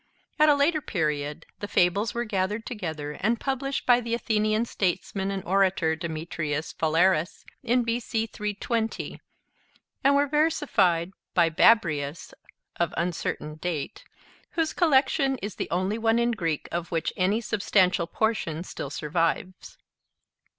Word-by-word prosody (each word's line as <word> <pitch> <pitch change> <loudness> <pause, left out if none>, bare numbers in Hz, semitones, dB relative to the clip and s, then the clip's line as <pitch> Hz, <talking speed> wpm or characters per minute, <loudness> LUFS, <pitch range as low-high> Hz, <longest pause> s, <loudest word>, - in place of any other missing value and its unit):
At 305 0 +6
a 295 - +6
later 305 +3 +2
period, 150 - -2
the 205 - -4
fables 200 +4 +2
were 240 0 -1
gathered 210 +1 -1
together 160 - -4
and 220 +9 0
published 275 0 -2
by 245 -1 +5
the 235 0 -1
Athenian 215 -1 +1
statesman 190 -1 -2
and 195 -2 -3
orator, 185 -4 +2
Demetrius 160 -2 -4
Phalereus, 165 +1 +1 0.2
in 245 0 +2
B.C. 230 -1 -1
320, 220 +1 -3 0.8
and 275 +1 +5
were 285 +1 +4
versified 270 - +2 0.2
by 170 -2 +4
Babrius 155 -6 +2 0.4
(of 170 -2 -1
uncertain 165 -3 -2
date), 160 -3 -4 0.5
whose 325 -2 0
collection 270 -4 +3
is 205 -3 -5
the - - -3
only 185 +5 -1
one 225 0 +2
in 235 0 +2
Greek 165 -9 -2
of 170 0 -3
which 165 -1 -1
any 195 +4 +2
substantial 190 -6 +2
portion 175 -8 -1
still 145 - -6
survives. 165 +5 -2
195 Hz, 130 wpm, -26 LUFS, 165-235 Hz, 0.8 s, At